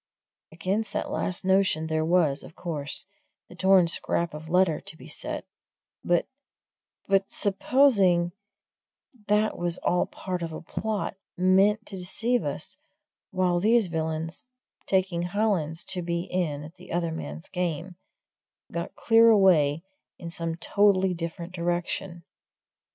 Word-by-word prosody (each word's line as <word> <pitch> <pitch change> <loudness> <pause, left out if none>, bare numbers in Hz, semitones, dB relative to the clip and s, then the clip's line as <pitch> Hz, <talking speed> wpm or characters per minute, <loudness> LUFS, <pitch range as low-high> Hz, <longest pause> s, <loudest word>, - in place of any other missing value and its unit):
Against 190 +7 -2
that - - -2
last 185 0 -2
notion 190 -4 +2
there 160 0 0
was, 160 -4 +2
of - - -13
course, 150 -5 0 0.4
the - - -11
torn 190 -1 +5
scrap 170 0 -1
of 155 +1 -8
letter 180 -3 +3
to 160 - -12
be - - -12
set; - - -5 0.6
but 175 -1 +2 0.8
but 195 0 +2
supposing 195 -5 +3 1.0
that 210 +1 +2
was 175 0 0
all 180 - +2
part 180 -2 -5
of 165 -1 -4
a 155 - -6
plot, 210 +2 -3 0.2
meant 195 +4 +3
to 195 - -8
deceive 230 +7 +1
us - - -4 0.5
while 180 -1 +1
these 220 0 +3
villains 160 +3 -3 0.4
taking 185 -3 +1
Hollins 175 -4 0
to 185 -1 -2
be 170 0 -1
in 160 -6 -2
at 160 +4 -12
the 180 - -13
other 170 -1 0
man's 75 - -6
game 180 0 -3 0.8
got - - -4
clear 230 0 +5
away 170 -8 +4 0.3
in 170 -1 -7
some 165 -1 -3
totally 190 +1 +2
different 170 +1 -6
direction? 175 0 -3
175 Hz, 135 wpm, -26 LUFS, 165-195 Hz, 1.0 s, torn